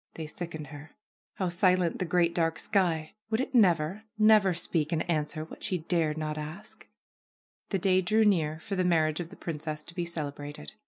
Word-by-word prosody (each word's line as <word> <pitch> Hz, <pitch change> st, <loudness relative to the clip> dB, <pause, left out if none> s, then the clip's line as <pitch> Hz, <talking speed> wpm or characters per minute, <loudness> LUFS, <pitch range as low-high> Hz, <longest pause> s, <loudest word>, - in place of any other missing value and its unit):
They 160 Hz, -, -5 dB
sickened 155 Hz, 0 st, -6 dB
her. 145 Hz, +2 st, -11 dB, 0.4 s
How 185 Hz, -2 st, -1 dB
silent 180 Hz, -1 st, +2 dB
the 185 Hz, -, 0 dB
great, 170 Hz, 0 st, +2 dB
dark 165 Hz, -1 st, +1 dB
sky! 170 Hz, -6 st, 0 dB, 0.2 s
Would 220 Hz, 0 st, +1 dB
it 265 Hz, -, -2 dB
never, 185 Hz, -2 st, +3 dB
never 215 Hz, -3 st, +6 dB
speak 165 Hz, -2 st, 0 dB
and 160 Hz, -1 st, -1 dB
an 155 Hz, -3 st, +1 dB
swer 155 Hz, +1 st, -6 dB
what -, -, -11 dB
she 195 Hz, -4 st, 0 dB
dared 160 Hz, -2 st, 0 dB
not 155 Hz, -1 st, -3 dB
ask? 160 Hz, +8 st, -9 dB, 0.8 s
The 195 Hz, -, +1 dB
day 185 Hz, 0 st, +3 dB
drew 215 Hz, +5 st, +3 dB
near 160 Hz, -6 st, +2 dB
for 200 Hz, -, -4 dB
the 185 Hz, -, +1 dB
marriage 160 Hz, -3 st, +2 dB
of 170 Hz, -2 st, -4 dB
the -, -, -12 dB
princess 155 Hz, -2 st, -5 dB
to 170 Hz, -, -11 dB
be 175 Hz, -1 st, -2 dB
celebrated. 145 Hz, -, -6 dB
170 Hz, 195 wpm, -29 LUFS, 155-185 Hz, 0.8 s, never